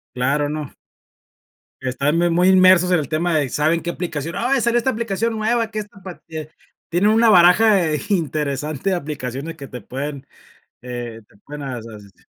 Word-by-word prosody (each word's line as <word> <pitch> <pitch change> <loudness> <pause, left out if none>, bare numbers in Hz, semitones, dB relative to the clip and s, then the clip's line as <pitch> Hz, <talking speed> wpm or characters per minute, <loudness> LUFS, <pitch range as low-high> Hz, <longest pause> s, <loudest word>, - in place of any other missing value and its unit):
Claro, 140 +4 +1
no. 150 -2 -5 1.1
Están 135 +4 0
muy 175 +1 +2
muy 175 +2 +3
inmersos 185 -1 +6
en 180 - +4
el 145 - -4
tema 165 +2 0
de: 145 -3 0
"¿Saben 155 +5 +1
qué 170 - -4
aplicación?". 165 -2 -4
"Ay, 255 +4 +1
salió 235 +1 +2
esta 240 +2 +1
aplicación 230 -1 -2
nueva, 225 +1 0
que 215 - -3
esta 205 -1 -10
pa" 185 -2 -9
tiene 155 -1 -7 0.4
tienen 180 +5 +2
una 225 +1 +4
baraja 185 +4 +6
de 160 -5 +1
interesante 150 -2 -1
de 185 - +2
aplicaciones 145 -1 -5
que 140 - -9
te 125 -2 -8
pueden, 140 +4 -6 0.5
eh, 120 -2 -6
te - - -24
pueden 150 0 -8
a 130 -3 -4
asis 105 -4 -12
160 Hz, 180 wpm, -20 LUFS, 140-190 Hz, 1.1 s, inmersos